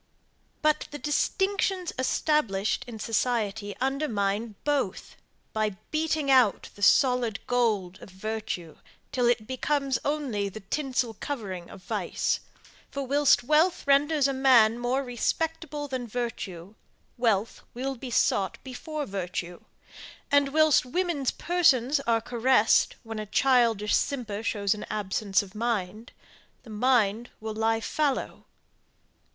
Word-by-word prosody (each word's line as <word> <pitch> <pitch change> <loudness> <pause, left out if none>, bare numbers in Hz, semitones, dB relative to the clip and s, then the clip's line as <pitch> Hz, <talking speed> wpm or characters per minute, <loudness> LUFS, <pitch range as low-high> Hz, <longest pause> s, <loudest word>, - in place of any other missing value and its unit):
But, 305 0 +2
the 290 - -7
distinctions 380 +4 0
established 255 -7 +1
in 235 -2 -7
society 220 -2 -1
undermine 230 -6 -1
both, 280 -10 -1 0.4
by 215 -3 -1
beating 310 -2 0
out 250 -6 +4
the 205 - -15
solid 245 0 +4
gold 215 -7 0
of - - -11
virtue, 190 -4 -5 0.3
till 245 -2 +1
it 240 -3 +1
becomes 270 +1 -1
only 265 -9 -1
the 215 +3 -9
tinsel 255 +1 -2
covering 195 -8 -6
of 190 - -12
vice; - - -1 0.5
for, 280 -1 -4
whilst 280 -2 +4
wealth 315 +7 +2
renders 280 +1 +3
a 275 - -1
man 245 -4 +5
more 250 +3 0
respectable 300 +4 -2
than 255 -3 -4
virtue, 205 -6 -5 0.4
wealth 225 -3 0
will 265 +2 -2
be 255 0 -8
sought 195 -4 +1
before 295 +3 -5
virtue; 180 -3 -5 0.7
and, 285 -1 +4
whilst 310 0 +4
women's 305 -1 -1
persons 295 -6 +2
are 230 -1 +3
caressed, 240 -1 +3
when 225 -1 -6
a 215 - -5
childish 230 -2 +3
simper 230 -7 -2
shows 205 -2 0
an 210 - -7
absence 200 -1 0
of 195 -1 -13
mind 215 -1 -3 0.5
the 225 - -12
mind 230 -1 +2
will 220 0 -5
lie 225 +1 +1
fallow. 285 +3 -2
240 Hz, 125 wpm, -27 LUFS, 210-280 Hz, 0.7 s, man